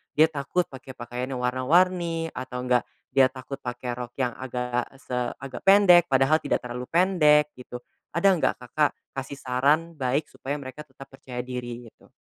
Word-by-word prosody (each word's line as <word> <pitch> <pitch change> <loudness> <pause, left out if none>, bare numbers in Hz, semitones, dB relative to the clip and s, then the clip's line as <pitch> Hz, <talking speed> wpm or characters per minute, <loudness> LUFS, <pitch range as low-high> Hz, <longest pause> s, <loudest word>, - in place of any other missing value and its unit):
dia 160 +2 +5
takut 150 +5 -1
pakai 130 -1 -10
pakaian 125 +1 -5
yang 125 - -4
warna-warni 165 +5 +2
atau 125 0 -6
enggak 125 -1 +2 0.3
dia 135 0 +5
takut 130 +1 -8
pakai 125 0 -5
rok 120 -1 -7
yang 125 -2 0
agak 125 -1 -3 0.2
se 125 - -4 0.2
agak 135 -2 -8
pendek, 180 -4 +7
padahal 135 +4 +3
tidak - - -1
terlalu 125 +1 -6
pendek 150 -4 +4
gitu, 125 -1 -9 0.4
ada 195 +3 +5
nggak 160 - +1
Kakak 135 +5 +1 0.2
kasih 135 +1 -6
saran 145 +6 +1
baik 135 +2 -1
supaya 140 +2 -5
mereka 135 +2 -8
tetap 135 +1 -13
percaya 130 -2 -8
diri, 120 -1 -6
gitu? - - -24
135 Hz, 165 wpm, -26 LUFS, 125-155 Hz, 0.4 s, pendek